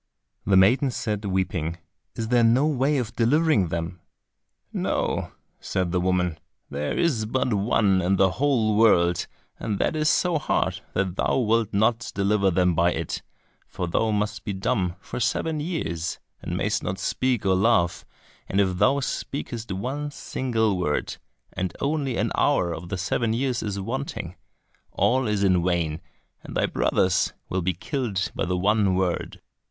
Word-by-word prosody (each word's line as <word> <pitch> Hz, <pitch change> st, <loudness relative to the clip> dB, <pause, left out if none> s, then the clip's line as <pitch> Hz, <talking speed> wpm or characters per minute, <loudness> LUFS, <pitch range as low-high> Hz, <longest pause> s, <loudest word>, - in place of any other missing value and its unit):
The 100 Hz, -2 st, +5 dB
maiden 125 Hz, +9 st, +5 dB
said, 105 Hz, -4 st, -3 dB
weeping, 90 Hz, -4 st, -1 dB, 0.4 s
"Is 110 Hz, -1 st, -3 dB
there 120 Hz, -1 st, +4 dB
no 120 Hz, +5 st, +4 dB
way 145 Hz, -1 st, +1 dB
of 120 Hz, -4 st, -3 dB
delivering 120 Hz, -, +3 dB
them?" 85 Hz, +2 st, -4 dB, 0.7 s
"No," -, -, -1 dB, 0.3 s
said 90 Hz, -2 st, -2 dB
the 90 Hz, -1 st, +1 dB
woman, 90 Hz, -3 st, 0 dB, 0.3 s
"there 75 Hz, +1 st, -2 dB
is 130 Hz, -11 st, +1 dB
but 125 Hz, 0 st, 0 dB
one 100 Hz, -2 st, +2 dB
in 95 Hz, +2 st, +2 dB
the 95 Hz, 0 st, +3 dB
whole 120 Hz, -6 st, +1 dB
world, 90 Hz, -6 st, +4 dB, 0.3 s
and 105 Hz, -3 st, -2 dB
that 155 Hz, -, 0 dB
is 155 Hz, 0 st, +2 dB
so 175 Hz, -4 st, +2 dB
hard -, -, 0 dB
that 95 Hz, -1 st, -1 dB
thou -, -, +1 dB
wilt 115 Hz, -3 st, +2 dB
not 110 Hz, +3 st, +1 dB
deliver 100 Hz, 0 st, +2 dB
them 90 Hz, 0 st, +2 dB
by 85 Hz, +1 st, +3 dB
it, 80 Hz, -2 st, -3 dB, 0.5 s
for 90 Hz, -1 st, -4 dB
thou 110 Hz, +6 st, +1 dB
must 105 Hz, 0 st, -1 dB
be 100 Hz, -, -3 dB
dumb 95 Hz, -2 st, -1 dB
for 95 Hz, -, -6 dB
seven 155 Hz, +7 st, 0 dB
years, 90 Hz, -, -3 dB, 0.2 s
and -, -, -3 dB
mayst -, -, 0 dB
not 95 Hz, -, -3 dB
speak 125 Hz, +4 st, 0 dB
or 95 Hz, -, +4 dB
laugh, 95 Hz, -3 st, +2 dB, 0.5 s
and 95 Hz, -, +1 dB
if 95 Hz, -2 st, +2 dB
thou 140 Hz, +1 st, +3 dB
speakest 120 Hz, -4 st, -4 dB
one 130 Hz, +10 st, -3 dB
single 110 Hz, -8 st, -1 dB
word, 75 Hz, -4 st, -1 dB, 0.4 s
and 90 Hz, -2 st, -3 dB
only 140 Hz, -4 st, -1 dB
an -, -, 0 dB
hour 85 Hz, -1 st, +2 dB
of 85 Hz, +1 st, -7 dB
the 95 Hz, -, -2 dB
seven 110 Hz, +5 st, 0 dB
years 125 Hz, 0 st, 0 dB
is 100 Hz, -2 st, -3 dB
wanting, 115 Hz, -, -4 dB, 0.6 s
all 130 Hz, 0 st, +2 dB
is 105 Hz, -1 st, 0 dB
in 90 Hz, -3 st, +3 dB
vain, 85 Hz, -3 st, 0 dB, 0.4 s
and -, -, -6 dB
thy -, -, +3 dB
brothers 95 Hz, -1 st, +1 dB, 0.2 s
will 95 Hz, -, -1 dB
be 90 Hz, +2 st, 0 dB
killed 95 Hz, -, -2 dB
by -, -, -1 dB
the 90 Hz, 0 st, -1 dB
one 100 Hz, 0 st, +2 dB
word." 90 Hz, -2 st, -1 dB
100 Hz, 165 wpm, -25 LUFS, 90-120 Hz, 0.7 s, The